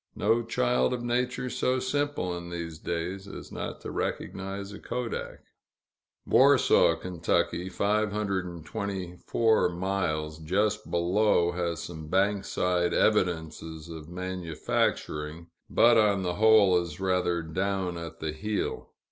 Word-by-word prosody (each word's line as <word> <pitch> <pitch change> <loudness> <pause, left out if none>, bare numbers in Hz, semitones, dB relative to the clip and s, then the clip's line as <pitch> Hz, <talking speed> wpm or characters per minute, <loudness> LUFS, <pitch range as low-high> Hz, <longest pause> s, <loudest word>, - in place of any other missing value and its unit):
No 115 +3 +2
child 125 +2 +1
of 120 - -6
nature 125 +1 -1
so 130 +1 0
simple, 130 -7 -1
in 85 0 -7
these 85 -2 -5
days, 90 +4 -4
as - - -9
not - - -5
to - - -6
recognize 100 +1 -4
a - - -9
kodak. 125 -2 -4 0.8
Warsaw, - - +5
Ky. 90 0 -1
(524 100 0 0
miles), 85 -4 -2
just 105 +6 0
below, 85 0 +2
has 85 -2 -2
some 80 -3 -7
bankside 90 -1 +1
evidences 80 -5 0
of 80 -1 -8
manufacturing, 85 -3 -2 0.2
but 120 -1 +5
on 100 -3 +3
the 90 -1 -1
whole 105 -3 +5
is 85 -2 -7
rather 90 -3 +1
down 95 +2 -1
at 85 -1 -8
the 80 -1 -2
heel. 105 +7 -3
95 Hz, 115 wpm, -28 LUFS, 85-105 Hz, 0.8 s, Warsaw